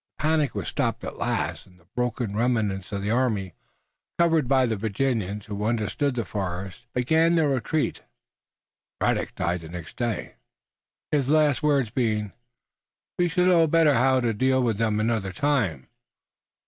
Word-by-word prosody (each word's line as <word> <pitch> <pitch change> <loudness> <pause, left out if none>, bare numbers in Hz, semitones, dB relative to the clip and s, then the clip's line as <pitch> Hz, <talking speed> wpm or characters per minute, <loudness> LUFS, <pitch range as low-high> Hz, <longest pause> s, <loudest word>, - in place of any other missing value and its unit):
The - - -8
panic 155 -4 +1
was - - -3
stopped - - -1
at - - -6
last - - -2
and 90 -1 -21
the 85 - -26
broken 120 -3 -2
remnants 105 -5 0
of 100 -1 -3
the 105 - -1
army, 110 -7 0 0.6
covered 165 -5 +3
by 130 0 +4
the 115 -2 0
Virginians 105 -1 -2
who 105 0 -5
understood 120 +5 0
the 115 -3 -2
forest, 95 +3 -5
began 160 +7 +3
their 160 -3 +3
retreat. 140 +4 -1 1.0
Braddock - - 0
died 85 0 -1
the 80 - -10
next 85 -1 -9
day, 120 -3 -3 0.7
his 140 -3 +1
last 150 -4 +3
words 140 -7 +2
being, 110 -4 0 0.9
"We 175 - +4
shall 180 +2 +1
know 170 -3 +5
better 160 -1 +4
how 130 +1 +3
to 115 -2 +1
deal 130 +4 +2
with 110 -4 0
them 110 -2 +1
another 110 -3 0
time." 115 - 0
120 Hz, 160 wpm, -25 LUFS, 105-145 Hz, 1.0 s, know